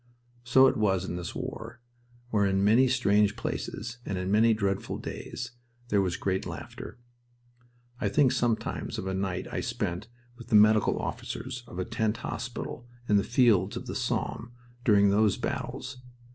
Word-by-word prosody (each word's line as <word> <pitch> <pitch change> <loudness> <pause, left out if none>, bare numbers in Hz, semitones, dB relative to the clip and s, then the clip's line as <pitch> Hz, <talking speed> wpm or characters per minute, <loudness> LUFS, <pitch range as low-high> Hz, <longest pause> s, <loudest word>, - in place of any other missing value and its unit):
So 130 +2 +6
it 130 - +3
was 95 -4 +1
in - - -4
this 90 -1 -5
war, 115 +2 -6 0.5
where 100 -2 +3
in 95 0 +1
many 115 +6 +5
strange 105 -4 +3
places 115 +2 -4
and 95 - -3
in 95 +1 -2
many 110 +2 +5
dreadful 100 -3 -1
days 120 0 -6 0.4
there 100 -3 +3
was 90 -3 -1
great 95 -1 -1
laughter. - - -8 1.0
I - - 0
think 140 -4 +4
sometimes 120 -3 -1
of - - -4
a 95 - -2
night 95 -1 -2
I - - -2
spent 90 +5 -3 0.3
with 120 - -11
the - - +2
medical 105 0 +5
officers 125 -1 -5
of 90 - -10
a 90 - -1
tent 110 -1 -1
hospital 120 0 -5 0.2
in 105 - +4
the 100 - +2
fields 115 -6 +3
of - - -6
the - - -5
Somme 120 +1 -2 0.3
during 100 -4 +5
those 105 0 +3
battles. 140 - -4
105 Hz, 165 wpm, -28 LUFS, 100-120 Hz, 1.0 s, So